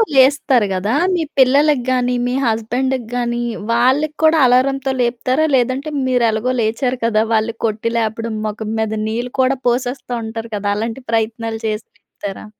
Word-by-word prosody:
లేస్తారు 265 Hz, -4 st, +4 dB
గదా! 195 Hz, +4 st, -1 dB, 0.2 s
మీ 340 Hz, -, 0 dB, 0.2 s
పిల్లలకి 275 Hz, +1 st, +4 dB
గానీ, 250 Hz, -1 st, +1 dB
మీ 245 Hz, -, -1 dB
హస్బాండ్‌కి 240 Hz, +2 st, -1 dB
గానీ, 240 Hz, 0 st, -1 dB, 0.3 s
వాళ్ళకి 265 Hz, +6 st, +2 dB
కూడా 315 Hz, +1 st, +5 dB
అలారం‌తో 265 Hz, +2 st, +2 dB
లేపుతారా? 255 Hz, +5 st, +1 dB
లేదంటే 260 Hz, +4 st, 0 dB, 0.2 s
మీరు 250 Hz, -2 st, +2 dB
ఎలాగో 220 Hz, +4 st, -1 dB
లేచారు 245 Hz, +3 st, -1 dB
కదా! 220 Hz, -1 st, +2 dB
వాళ్ళు 220 Hz, +1 st, +1 dB
కొట్టి 220 Hz, +1 st, -1 dB
లేపడం. 225 Hz, 0 st, -2 dB
మొఖం 215 Hz, 0 st, -5 dB
మీద 220 Hz, -1 st, -1 dB, 0.2 s
నీళ్ళు 240 Hz, +3 st, -3 dB
కూడా 260 Hz, +1 st, +2 dB
పోసేస్తా 245 Hz, +1 st, -1 dB
ఉంటారు 225 Hz, +1 st, -6 dB
కదా! 205 Hz, 0 st, -2 dB
అలాంటి 225 Hz, +4 st, -4 dB
ప్రయత్నాలు 225 Hz, 0 st, -1 dB
చేసి 215 Hz, 0 st, -3 dB
లేపుతారా? 205 Hz, -2 st, -9 dB
240 Hz, 150 wpm, -18 LUFS, 220-260 Hz, 0.3 s, కూడా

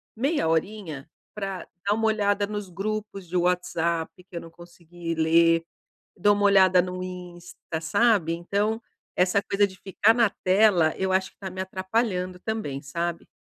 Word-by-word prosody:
meia 275 Hz, -, 0 dB
horinha, 160 Hz, -3 st, -2 dB, 0.2 s
pra 195 Hz, -3 st, -5 dB, 0.2 s
dar 205 Hz, +1 st, +2 dB
uma 225 Hz, -, 0 dB
olhada 205 Hz, -2 st, +2 dB
nos 205 Hz, -2 st, -5 dB
grupos 200 Hz, +1 st, -4 dB
de 180 Hz, -, -7 dB
WhatsApp, 175 Hz, -2 st, 0 dB, 0.2 s
que 175 Hz, -, -12 dB
eu 170 Hz, -, -3 dB
não 165 Hz, -, -12 dB
consegui 170 Hz, -1 st, -8 dB
ler. 165 Hz, +1 st, +4 dB, 0.5 s
Dou 205 Hz, +3 st, +4 dB
uma 205 Hz, 0 st, 0 dB
olhada 190 Hz, -2 st, +6 dB
no 180 Hz, 0 st, -4 dB
Insta, 175 Hz, -2 st, -7 dB
sabe, 170 Hz, 0 st, +3 dB
então, 200 Hz, +6 st, -1 dB, 0.3 s
essa 185 Hz, +2 st, +2 dB
coisa 200 Hz, 0 st, +2 dB
de 190 Hz, -1 st, -12 dB
ficar 205 Hz, +3 st, +3 dB
na 230 Hz, -3 st, +3 dB
tela, 185 Hz, -4 st, +4 dB
eu 190 Hz, 0 st, -1 dB
acho 190 Hz, 0 st, +1 dB
que -, -, -41 dB
tá 190 Hz, -2 st, -6 dB
me 185 Hz, +1 st, -6 dB
atrapalhando 190 Hz, -1 st, -2 dB
também, 210 Hz, -11 st, -3 dB
sabe. 170 Hz, +4 st, -3 dB
185 Hz, 160 wpm, -25 LUFS, 170-205 Hz, 0.5 s, olhada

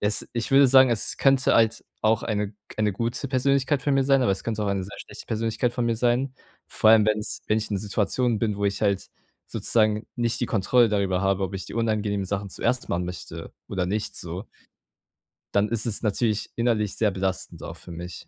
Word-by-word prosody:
Es 105 Hz, +1 st, 0 dB
ich 115 Hz, -1 st, -3 dB
würde 135 Hz, 0 st, +7 dB
sagen, 130 Hz, 0 st, +7 dB
es 115 Hz, -3 st, 0 dB
könnte 135 Hz, -1 st, +3 dB
halt 115 Hz, -1 st, +2 dB, 0.2 s
auch 110 Hz, 0 st, +2 dB
eine 105 Hz, -2 st, -2 dB
k -, -, -25 dB, 0.2 s
eine 105 Hz, -1 st, +2 dB
gute 115 Hz, +7 st, -2 dB
Persönlichkeit 135 Hz, +1 st, +1 dB
für 145 Hz, -, 0 dB
mir 135 Hz, -1 st, +3 dB
sein, 135 Hz, -1 st, +3 dB
aber 110 Hz, -, +2 dB
es 95 Hz, -, -5 dB
könnte 110 Hz, -2 st, -2 dB
auch -, -, -1 dB
eine 100 Hz, -1 st, -1 dB
sehr 100 Hz, -, -10 dB
schlechte -, -, -11 dB
Persönlichkeit 115 Hz, +2 st, -1 dB
von 120 Hz, -, -1 dB
mir 115 Hz, -, 0 dB
sein. 125 Hz, +3 st, +1 dB, 0.4 s
Vor 110 Hz, -, +3 dB
allem, 110 Hz, -1 st, +6 dB
wenn 110 Hz, 0 st, +2 dB
es 105 Hz, -, -6 dB
wenn 110 Hz, -, +3 dB
ich 110 Hz, -, -3 dB
in 105 Hz, -, 0 dB
einer -, -, -3 dB
Situation 110 Hz, +3 st, 0 dB
bin, 105 Hz, -2 st, -1 dB
wo 100 Hz, -, -2 dB
ich 100 Hz, -, -2 dB
halt 100 Hz, -2 st, 0 dB, 0.4 s
sozusagen 110 Hz, -1 st, +1 dB
nicht 120 Hz, -1 st, 0 dB
die 120 Hz, -, 0 dB
Kontrolle 115 Hz, +3 st, +3 dB
darüber 100 Hz, -3 st, 0 dB
habe, 95 Hz, 0 st, +1 dB
ob 95 Hz, +1 st, -5 dB
ich 95 Hz, -, -5 dB
die -, -, -9 dB
unangenehmen 105 Hz, -3 st, 0 dB
Sachen 100 Hz, +1 st, -3 dB
zuerst 120 Hz, +6 st, -1 dB
machen 90 Hz, +1 st, -1 dB
möchte 90 Hz, 0 st, -8 dB, 0.2 s
oder 95 Hz, -2 st, -1 dB
nicht, 105 Hz, +3 st, -2 dB
so. 90 Hz, +4 st, -5 dB, 1.1 s
Dann 100 Hz, +1 st, +3 dB
ist 115 Hz, -1 st, +1 dB
es 110 Hz, -, -1 dB
natürlich 110 Hz, 0 st, 0 dB
innerlich 115 Hz, -4 st, 0 dB
sehr 110 Hz, -, +2 dB
belastend 95 Hz, 0 st, -3 dB
auch -, -, -7 dB
für -, -, -12 dB
mich. 85 Hz, +1 st, -8 dB
110 Hz, 220 wpm, -25 LUFS, 100-120 Hz, 1.1 s, würde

